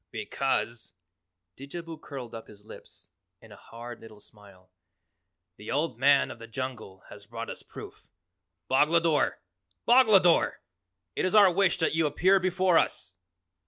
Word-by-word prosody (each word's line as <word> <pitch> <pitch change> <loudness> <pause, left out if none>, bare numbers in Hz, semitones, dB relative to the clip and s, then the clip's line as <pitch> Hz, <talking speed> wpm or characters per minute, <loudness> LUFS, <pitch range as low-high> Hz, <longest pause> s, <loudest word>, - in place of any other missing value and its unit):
"Because," 115 -5 -3 0.6
Didjabo 165 +5 -8
curled 130 -5 -9
up 115 -1 -9
his 105 -1 -16
lips - - -14 0.3
in - - -18
a - - -12
hard 120 +1 -11
little 110 -2 -14
smile, 100 -3 -19 0.9
"the 105 - -11
Old 145 -4 -2
Man 140 +1 +3
of - - -11
the 115 - -10
Jungle 115 -5 -7
has 100 0 -13
brought 115 0 -7
us - - -8
proof. - - -12 0.6
Boglodore! 155 +3 +2 0.5
BOGLODORE! 215 -8 +4 0.6
It - - -2
is 185 +3 0
our 200 -3 +7
wish 195 +2 +2
that 160 -3 0
you 160 -1 +1
appear 190 +6 +3
before 185 -1 +2
us." 90 +1 -3
135 Hz, 140 wpm, -27 LUFS, 115-170 Hz, 0.9 s, our